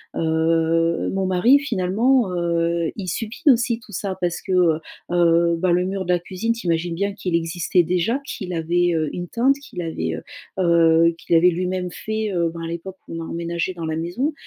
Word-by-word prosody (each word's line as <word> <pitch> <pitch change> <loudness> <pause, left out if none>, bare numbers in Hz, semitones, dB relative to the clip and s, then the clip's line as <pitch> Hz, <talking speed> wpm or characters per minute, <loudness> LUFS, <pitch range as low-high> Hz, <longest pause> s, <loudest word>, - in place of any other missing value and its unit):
heu, 165 +1 +1
mon 195 0 0
mari 190 +9 +5
finalement, 230 -1 +1
heu, 170 -1 0
il 190 - -5
subit 225 - -4
aussi 240 -2 +4
tout 230 -3 -16
ça 190 +1 -3
parce 175 -1 -1
que, 190 - -6
heu 170 -3 +3 0.3
heu, 170 -1 +3
bah, 180 +1 +1
le 180 +1 +2
mur 190 -1 -3
de 180 - +2
la 175 - +2
cuisine 185 +6 -3
t'imagines 170 -5 -1
bien 200 +3 -1
qu'il 185 -4 -4
existait 170 +2 +1
déjà, 180 - 0
qu'il 220 -10 -6
avait, 170 +1 +1
heu, 155 -2 0
une 175 0 -4
teinte, 260 +4 +2
qu'il 180 -10 -7
avait, 80 - -3
heu - - -8 0.4
heu, 165 -1 +4
qu'il 170 - 0
avait 175 +2 +6
lui-même 180 +1 -2
fait, 215 +1 -3
heu, 170 -2 +1
ben 170 - -7
à 165 - -4
l'époque 170 +3 -6
où - - -7
on 165 - -4
a - - -7
emménagé 170 +2 -3
dans 170 -2 -6
la 160 - -2
maison 180 - -2
175 Hz, 205 wpm, -22 LUFS, 165-195 Hz, 0.4 s, avait